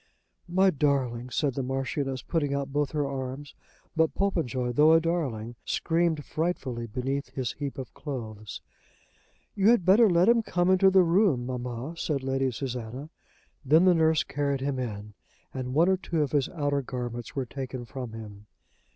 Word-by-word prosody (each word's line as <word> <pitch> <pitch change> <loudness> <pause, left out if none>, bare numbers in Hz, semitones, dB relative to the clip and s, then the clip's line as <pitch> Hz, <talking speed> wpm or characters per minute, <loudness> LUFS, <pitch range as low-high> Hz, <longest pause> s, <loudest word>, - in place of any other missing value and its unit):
"My 190 +2 +4
darling," 130 -5 0
said 140 +1 0
the 135 - -2
Marchioness, 135 +1 -2
putting 145 -4 -1
out 140 -1 -3
both 145 -1 +1
her 145 -2 0
arms. 135 +1 -5 0.4
But 160 -1 +2
Popenjoy, 135 -11 0
though 150 +6 +5
a 165 - +7
darling, 130 -9 -2
screamed 165 -3 0
frightfully 135 -8 -2
beneath 135 +5 -3
his 130 -3 -1
heap 140 -2 -5
of 130 -3 -7
clothes. 110 -7 -7 0.9
"You 200 +1 +3
had 235 -7 +4
better 210 +4 +6
let 175 +1 +4
him 235 0 +5
come 180 -4 +1
into 190 +1 +5
the 190 -1 +5
room, 170 - +3
mamma," 125 +3 -4
said 145 -5 -2
Lady 135 0 0
Susanna. 125 +3 -5 0.5
Then 155 +6 +5
the 185 - +6
nurse 160 -2 +3
carried 140 -1 -2
him 135 -1 -1
in, 105 -4 -5 0.4
and 130 0 -4
one 165 +3 +5
or 190 0 +3
two 170 -4 -1
of 145 - -3
his 145 -3 +1
outer 145 -4 -1
garments 120 -3 -6
were 135 -2 -1
taken 130 -1 -6
from 125 -2 -7
him. 105 -2 -10
140 Hz, 170 wpm, -27 LUFS, 125-165 Hz, 0.9 s, a